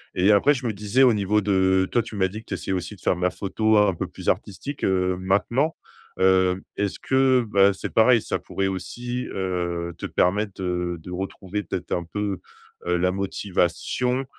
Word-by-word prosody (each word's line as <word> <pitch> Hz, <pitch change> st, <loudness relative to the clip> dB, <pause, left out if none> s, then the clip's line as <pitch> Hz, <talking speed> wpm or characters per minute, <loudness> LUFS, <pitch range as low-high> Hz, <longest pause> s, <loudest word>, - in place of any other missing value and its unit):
et 95 Hz, +3 st, +4 dB
après, 105 Hz, +8 st, +5 dB
je 130 Hz, -2 st, -5 dB
me -, -, 0 dB
disais 105 Hz, +5 st, 0 dB
au 125 Hz, -3 st, +6 dB
niveau 105 Hz, 0 st, +1 dB
de, 95 Hz, -1 st, +2 dB
toi, 120 Hz, -, +2 dB
tu 110 Hz, -1 st, -9 dB
m'as 95 Hz, -2 st, +2 dB
dit 105 Hz, +4 st, -8 dB
que -, -, -25 dB
tu -, -, -6 dB
essayais -, -, -4 dB
aussi 90 Hz, +2 st, -4 dB
de 95 Hz, -, -21 dB
faire -, -, +2 dB
de -, -, -8 dB
ma 90 Hz, 0 st, +2 dB
photo 110 Hz, +4 st, +1 dB
un 100 Hz, -3 st, +3 dB
peu -, -, -3 dB
plus -, -, -4 dB
artistique, 135 Hz, +8 st, -3 dB
heu, 90 Hz, -1 st, +1 dB
maintenant, 110 Hz, -, +1 dB, 0.4 s
heu, 95 Hz, 0 st, +3 dB, 0.2 s
est-ce 100 Hz, -1 st, -2 dB
que 130 Hz, -1 st, +3 dB
bah, 100 Hz, 0 st, +5 dB
c'est 95 Hz, -, -6 dB
pareil 115 Hz, +1 st, +5 dB
ça -, -, -2 dB
pourrait 95 Hz, -, -2 dB
aussi, 120 Hz, +7 st, -4 dB
heu, 85 Hz, -2 st, -2 dB
te -, -, -6 dB
permettre 100 Hz, +1 st, 0 dB
de 90 Hz, -1 st, -2 dB
de 90 Hz, -, -9 dB
retrouver 95 Hz, +2 st, -4 dB
peut-être 90 Hz, -3 st, -5 dB
un 85 Hz, -, 0 dB
peu, 100 Hz, 0 st, -3 dB, 0.5 s
heu, 90 Hz, -, +1 dB
la 90 Hz, +1 st, +1 dB
motivation 100 Hz, +6 st, -1 dB
95 Hz, 200 wpm, -24 LUFS, 90-110 Hz, 0.5 s, au